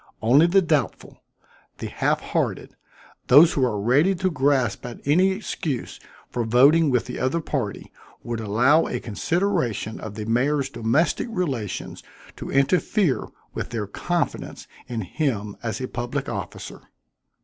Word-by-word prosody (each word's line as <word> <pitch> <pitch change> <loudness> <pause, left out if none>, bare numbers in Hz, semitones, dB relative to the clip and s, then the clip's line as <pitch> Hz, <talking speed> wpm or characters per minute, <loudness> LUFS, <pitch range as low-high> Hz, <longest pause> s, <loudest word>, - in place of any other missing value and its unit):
Only 135 +9 +5
the 190 +2 +4
doubtful 155 -6 -2 0.6
the - - -6
half - - 0
hearted - - -2 0.5
those 150 +6 +7
who 135 - +1
are 115 -5 0
ready 140 - +3
to 185 +1 0
grasp 130 -8 +1
at 120 -1 -7
any 175 +7 +4
excuse 185 - -4 0.3
for 120 - -1
voting 140 +8 +5
with 125 -3 +1
the 125 - -6
other 130 +6 0
party, 135 -10 -4 0.3
would 120 -1 -4
allow 120 +9 +3
a 125 - -3
consideration 125 - -1
of 110 -1 -7
the 105 0 -5
mayor's 135 +4 +1
domestic 140 - +1
relations 140 - -3 0.4
to - - -7
interfere 165 - +1 0.3
with - - -4
their 115 -3 -3
confidence 175 - -3 0.2
in 120 -3 -3
him 105 - -2
as 115 -2 -3
a 130 - -3
public 120 -1 -4
officer." - - -6
130 Hz, 140 wpm, -23 LUFS, 115-160 Hz, 0.6 s, those